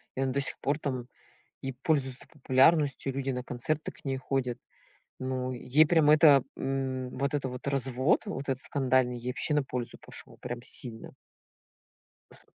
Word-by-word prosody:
И 135 - -2
она 135 -1 +1
до 140 - 0
сих 140 - +3
пор, 140 +1 0
там, 130 -5 -3 0.6
и 135 0 -3
пользуется 135 -2 -1
популярностью, 140 0 +3
и - - -9
люди 135 0 -1
на 125 -1 -3
концерты 140 +6 -3
к - - -18
ней 135 -1 -1
ходят. 130 -2 -2 0.6
Ну 130 -1 -3
ей 135 +5 +3
прям 160 -3 +4
это, 150 -3 +7
м, 130 -1 -2
вот 140 +2 -1
это 135 -2 -1
вот 125 +1 -8
развод, 135 - +1
вот 195 -10 -4
этот 135 0 -1
скандальный, 130 -3 +1
ей 120 +1 -4
вообще 150 - -1
на 150 - +3
пользу 125 -2 -5
пошёл, - - -10
прям 120 0 -5
сильно. 115 -3 +1 1.2
С - - -8
135 Hz, 170 wpm, -29 LUFS, 125-140 Hz, 1.2 s, это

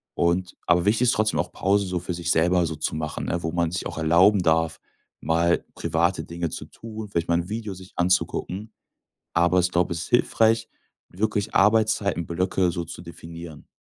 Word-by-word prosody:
und 85 +1 0
aber 90 0 +4
wichtig 110 +4 +3
ist - - +5
trotzdem 110 0 +1
auch, - - -1
Pause 100 +1 +1
so 90 -1 -2
für 90 - -4
sich 85 0 -2
selber 90 +2 +3
so 80 - -4
zu 75 - -2
machen, 75 -1 -4
ne, 85 0 -1
wo 80 - -1
man 85 -2 0
sich 90 - -3
auch - - -8
erlauben 90 +5 +4
darf, 80 0 +1 0.4
mal 85 +2 +2
private 85 +3 0
Dinge 85 -1 -3
zu - - -6
tun, 110 -1 -9
vielleicht 85 -3 -2
mal 85 - +4
'n 85 - -4
Video 110 -2 -4
sich 95 +1 -13
anzugucken. 90 +3 0 0.6
Aber 85 +1 +3
ich 90 - +1
glaub, 85 0 +1
es 85 - -2
ist - - -9
hilfreich, 115 -2 +3 0.4
wirklich 105 +2 -2
Arbeitszeitenblöcke 95 -4 +2
so 85 0 -3
zu 85 - -9
definieren. 85 -3 -10
90 Hz, 185 wpm, -24 LUFS, 85-100 Hz, 0.6 s, ist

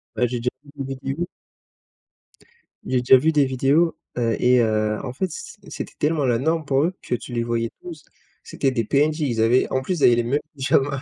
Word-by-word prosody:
Bah, 125 - +2
j'ai 125 +1 -3
déjà 125 +1 0
vu 145 - -18
une 135 - -4
vidéo 135 +4 -4 1.6
jai 130 -1 +1
déjà 130 +1 +6
vu 160 +5 +2
des 145 -3 +3
vidéos, 135 +6 +2 0.2
heu 115 -2 +1
et 125 0 +4
heu, 110 -1 +1
en 125 - -5
fait 185 +8 -2
c 465 - -8
c - - -15
c'était - - -6
tellement 150 -1 +1
la 120 -2 +2
norme 160 +4 0
pour 135 0 +2
eux, 175 +4 0
que 125 - -2
tu 120 - -9
les 120 -1 0
voyais 115 0 -1
tous. 165 -5 -9 0.4
C'étaient 135 - -1
des 115 -3 0
PNJ, 150 +7 +1
ils 120 -6 0
avaient, 120 +3 +3
en 130 - +1
plus 180 +4 -2
ils - - +1
avaient 120 - +6
les 120 - +1
mêmes 135 +5 0 0.2
pyjamas. 135 0 +1
130 Hz, 225 wpm, -22 LUFS, 120-150 Hz, 1.6 s, déjà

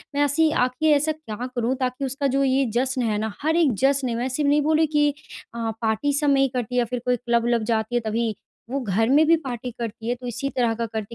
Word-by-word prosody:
मैं 285 - +1
ऐसी 310 +3 +2
आख़िर 255 +4 +2
ऐसा 300 +2 +1
क्या 250 -6 -6
करूँ 240 +2 0
ताकि 255 +1 -2
उसका 275 +2 -1
जो 275 - +2
ये 270 0 +2
जश्न 260 +1 0
है 220 -3 0
ना, 220 0 -3
हर 320 +2 +1
एक 310 -8 +3
जश्न 270 -1 +2
है 230 - -2
मैं 240 +2 -1
सिर्फ़ 285 +2 0
नहीं 295 +1 +4
बोली 315 +1 +2
कि 295 -1 +2 0.5
अ, 230 -1 -2
पार्टी 225 +6 0
सब 295 -2 +1
में 275 -1 +4
ही 270 - +4
करती 250 -2 -4
है 250 - +3
या 240 - +2
फिर 245 +1 -4
कोई 250 - +2
क्लब-व्लब 235 -1 0
जाती 220 +2 -1
है 240 - +2
तभी। 225 +1 -1 0.4
वो 275 +2 -1
घर 225 -1 0
में 295 +4 +5
भी 330 - +6
पार्टी 250 -1 -4
करती 230 0 -5
है - - +2
तो 250 0 -9
इसी 245 +3 -3
तरह 235 -3 +2
का 230 +1 -2
करती 220 0 -6
250 Hz, 260 wpm, -23 LUFS, 230-280 Hz, 0.5 s, भी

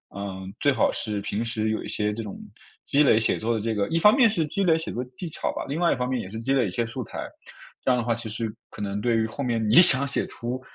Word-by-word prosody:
嗯， 95 -1 -6
最 140 - +3
好 125 - +2
是 105 -2 -2
平 105 +2 -2
时 110 -1 -1
有 110 - -2
一 - - -7
些 105 0 -1
这 115 - -5
种 105 -3 -7 0.5
积 145 - +2
累 120 -6 +5
写 110 - +1
作 115 +1 0
的 - - -1
这 110 +1 -1
个 100 -1 0
一 165 - 0
方 210 +6 +6
面 250 -4 +6
是 170 -7 0
积 195 +7 -2
累 165 -3 +4
写 160 - -5
作 125 - -3
技 180 - -4
巧 - - -2
吧， - - -5
另 145 +4 -3
外 175 -1 +3
一 - - +2
方 125 - -2
面 125 -2 -1
也 95 - -8
是 110 +3 -6
积 135 +4 0
累 130 -5 +2
一 - - -3
些 115 +6 -1
素 120 +2 -5
材， - - -7 0.6
这 - - +1
样 125 - +4
的 120 - -3
话 120 - +1
其 115 -1 -6
实 110 0 -4 0.2
可 - - -13
能 100 0 -3
对 120 0 +2
于 110 - +1
后 110 +6 -5
面 115 -3 -1
你 110 - +3
想 140 -6 +8
写 140 - -1
出， 125 +2 -5
115 Hz, 325 characters per minute, -25 LUFS, 110-140 Hz, 0.6 s, 想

